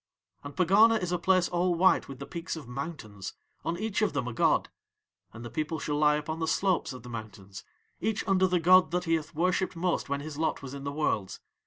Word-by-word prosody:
And 145 0 -8
Pegana 210 +6 +5
is 180 -2 -3
a 180 - 0
place 185 +1 +3
all 175 0 +1
white 185 +2 +3
with 135 - -8
the 140 - -7
peaks 170 +4 -5
of 155 -6 -9
mountains, 125 - -6 0.3
on 170 - -2
each 215 +1 -2
of 210 -8 +1
them 135 -4 -2
a 125 - -4
god, - - +2 0.6
and 115 +2 -10
the 120 - -7
people 155 +1 -2
shall 150 0 -2
lie 150 0 +4
upon 155 +2 -4
the 160 - -1
slopes 185 -1 +1
of 130 - -9
the 125 - -10
mountains 105 -4 -8 0.4
each 220 -1 -2
under 190 -1 +4
the 180 -1 +1
god 185 +2 +6
that 180 +2 -1
he 165 -1 0
hath 160 -1 -2
worshipped 185 +3 0
most 170 -3 -1
when 140 0 -1
his 150 0 -7
lot 160 -3 -1
was 135 -1 -7
in 140 0 -7
the 140 - -2
Worlds. 110 -10 -1
160 Hz, 230 wpm, -29 LUFS, 140-180 Hz, 0.6 s, god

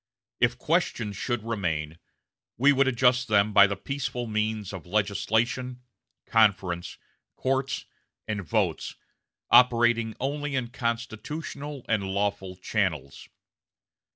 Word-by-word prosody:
If - - +2
questions 105 -2 0
should 120 -1 -2
remain, 85 -8 -3 0.6
we 140 +4 +5
would 135 0 +3
adjust 125 0 +3
them 105 -1 +3
by 100 -1 +8
the 100 - -2
peaceful 125 +2 -4
means 110 -2 -2
of 95 -2 -8
legislation, 110 +5 0 0.4
conference, 95 -6 +1 0.4
courts, 135 0 -1 0.4
and 105 -2 -2
votes, 85 - -1 0.6
operating 120 -2 +5
only 145 +1 -2
in 125 -3 -1
constitutional 125 +4 -4
and 110 -3 +1
lawful 95 -1 -2
channels.... 90 -8 -2
110 Hz, 105 wpm, -27 LUFS, 100-125 Hz, 0.6 s, by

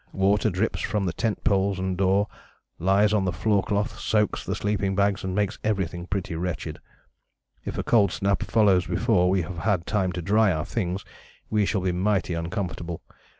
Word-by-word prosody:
water 100 +3 +2
drips 100 +4 -1
from 105 -3 -1
the 90 - -1
tent 110 +2 -2
poles 100 -3 +2
and 95 0 -2
door, 95 +2 +2 0.5
lies 100 +4 +3
on 105 -2 +2
the 95 - 0
floor 105 0 +1
cloth, 105 +1 -2
soaks 105 -2 0
the - - -3
sleeping 100 -2 -1
bags, 100 0 +1
and 95 0 -3
makes 105 -1 -1
everything 95 -5 -2
pretty 95 -3 -3
wretched. 80 -2 -4 0.9
If - - -4
a - - -1
cold 100 -6 +3
snap 100 -1 0
follows 100 -5 +3
before 90 +1 +2
we 95 -1 +2
have 85 +2 -6
had 95 -3 0
time 95 -3 0
to 90 - -4
dry 105 +2 +3
our 80 -1 -2
things, 95 -4 -3 0.5
we 105 -2 +2
shall 100 - 0
be 90 0 0
mighty 95 0 0
uncomfortable. 85 0 -4
95 Hz, 185 wpm, -25 LUFS, 90-105 Hz, 0.9 s, lies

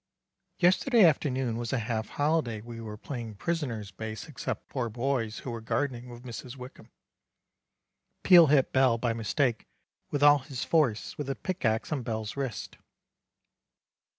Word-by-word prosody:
Yesterday 195 +5 +5
afternoon 130 -6 +1
was 120 -1 -3
a 135 - +1
half 110 -1 -2
holiday 145 -7 0
we 115 +1 -9
were 105 -1 -7
playing 115 -2 -6
prisoners 115 - -3
base 110 +2 -6
exept 130 -5 -5
four 125 -4 -2
boys 120 -1 -1
who 125 - -3
were 115 -1 -5
gardening 125 +1 -2
with 120 0 -11
Mrs 125 +1 -7
Wickham. 125 -1 -11 1.3
Peel 175 -4 +8
hit 140 -2 +3
Bell 130 -3 +4
by 115 0 0
mistake 115 +2 0 0.4
with 145 0 -1
all 145 0 +7
his 130 -1 -5
force 145 -9 +1
with 145 - -3
the 135 - -2
pic 185 +5 -4
axe 110 +5 0
on 150 -3 -1
Bell's 110 -2 -4
wrist. 135 -4 -5
125 Hz, 150 wpm, -29 LUFS, 115-145 Hz, 1.3 s, Peel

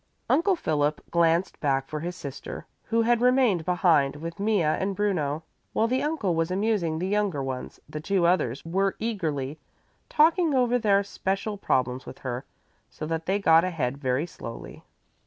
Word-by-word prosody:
Uncle 375 +4 +3
Philip 150 - 0
glanced 170 +1 +2
back 135 -2 0
for 150 - -4
his 175 +3 -4
sister, 140 -6 -7 0.2
who 230 0 +1
had 240 0 +2
remained 250 -8 +3
behind 165 -6 +3
with 165 +4 -7
Mea 205 -3 +2
and 190 +6 0
Bruno. 165 -7 -1 0.3
While 220 - +2
the 255 +3 +1
uncle 290 - 0
was 165 0 0
amusing 190 -4 0
the 180 +3 -2
younger 200 -8 0
ones, 130 -1 -5
the 150 - -6
two 185 +1 +1
others 160 -7 +1
were 195 +3 0
eagerly 155 - -3 0.5
talking 320 0 +4
over 245 -1 +3
their 200 -3 +3
special 195 +2 -2
problems 130 -9 -1
with - - -8
her, 130 +1 -5 0.4
so - - -7
that 160 +1 -3
they 195 +2 +2
got 165 -4 +5
ahead 140 -7 -2
very 130 +2 0
slowly. 115 -8 -9
175 Hz, 165 wpm, -26 LUFS, 150-210 Hz, 0.5 s, got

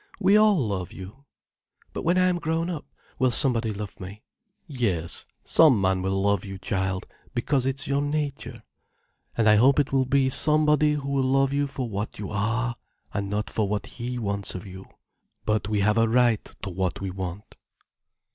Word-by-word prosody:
We 195 +2 +4
all 215 -2 +5
love 100 - -2
you." 100 +9 -11 0.7
"But - - -4
when 175 +2 +2
I 185 - +4
am 180 -1 +1
grown 165 +1 -1
up, 160 -4 -6 0.3
will 130 -1 +3
somebody 120 -3 +2
love 105 -1 -7
me?" 100 +3 -9 0.4
"Yes, 110 - -2 0.2
some 150 -9 +5
man 95 -1 +1
will 95 +1 -1
love 100 -2 +1
you, 95 -1 -7
child, 95 -1 -2 0.3
because 130 +2 +1
it's 135 +2 -1
your 140 0 +1
nature. 145 -1 -3 0.7
And 115 -1 +3
I 105 0 +6
hope 135 +5 +5
it 145 - +1
will 135 -1 +2
be 135 0 +2
somebody 150 0 +4
who 145 -2 -4
will 140 -1 +1
love 135 +1 +2
you 145 0 +1
for 135 -2 -4
what 105 0 -4
you 100 -2 -6
are, 115 +4 -1 0.4
and 100 -1 -2
not 105 0 -2
for 110 -2 0
what 105 0 -2
he 125 +1 -5
wants 100 -4 -1
of 90 - -6
you. 95 0 -10 0.6
But 105 -1 0
we 105 -2 +1
have 105 +3 +3
a 115 0 +3
right 120 -2 +3 0.2
to 95 - -4
what 90 0 -2
we 95 -1 -4
want." 95 +1 -7
115 Hz, 185 wpm, -25 LUFS, 100-140 Hz, 0.7 s, I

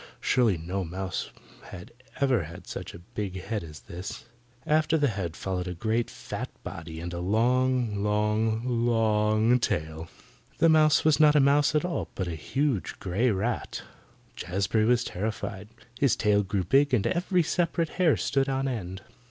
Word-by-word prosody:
Surely 115 -8 +2
no 90 +4 -3
mouse 90 +2 -4 0.4
had 90 - -10 0.3
ever 130 - +2
had 85 +2 -11
such - - -7
a 85 0 -13
big 95 -3 -3
head 100 +2 -3
as 75 -3 -10
that. 90 +3 -8 0.4
After 155 +1 +2
the 145 -3 +2
head 95 -6 -4
followed 90 -1 -3
a 90 - -4
great 110 +6 -1
fat - - -6
body, 80 -1 -7
and 85 +1 -5
a 85 - -4
long, 120 +2 +1
long, 105 +2 +1 0.2
LONG 110 +1 +3
tail. 80 -6 -2 0.5
The 165 - +4
mouse 155 -1 +4
was 155 -1 +4
not 150 -1 +6
a - - +6
mouse 145 +2 +4
at 150 - +2
all, 180 - -3
but 95 - -2
a 85 - -3
huge 130 - -1
grey 100 +7 +1
rat. 110 +3 -2 0.5
Jazbury 100 +4 0
was 125 0 +3
terrified. 105 0 -4 0.3
His 140 -3 +3
tail 105 -2 +3
grew 95 -1 -1
big 135 - +3
and 100 - 0
every 180 0 +1
separate 170 0 0
hair 165 -5 +4
stood 135 0 0
on 135 0 0
end. 95 -6 -5
110 Hz, 165 wpm, -27 LUFS, 95-135 Hz, 0.5 s, not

